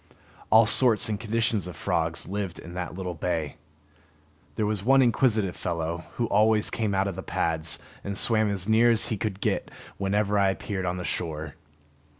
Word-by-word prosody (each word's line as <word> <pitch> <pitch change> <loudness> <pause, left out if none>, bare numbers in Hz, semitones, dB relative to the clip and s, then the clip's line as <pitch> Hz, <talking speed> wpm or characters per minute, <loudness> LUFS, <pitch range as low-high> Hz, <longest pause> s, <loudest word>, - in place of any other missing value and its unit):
All 110 +1 +7
sorts 120 0 +5
and 105 -2 -2
conditions 115 -3 0
of 90 - -8
frogs 80 0 -1
lived 100 -2 -4
in 85 - -10
that 90 -1 -5
little 90 -1 -4
bay. 80 -3 -3 1.0
There 110 - 0
was 105 -2 -2
one 135 +4 +5
inquisitive 110 -6 +2
fellow, 85 0 -3
who 120 - 0
always 110 0 +2
came 105 -3 -1
out 95 +1 +1
of 95 - -4
the - - -5
pads 80 0 -2 0.3
and 100 0 -4
swam 110 -2 +2
as 100 -1 -3
near 115 +2 +5
as 115 -1 +3
he 110 - -1
could 100 -1 -3
get - - -1 0.3
whenever 100 +1 +1
I 100 -1 +4
appeared 95 -1 -3
on 90 +1 -2
the 90 - -5
shore. 80 -4 -4
100 Hz, 180 wpm, -26 LUFS, 90-110 Hz, 1.0 s, All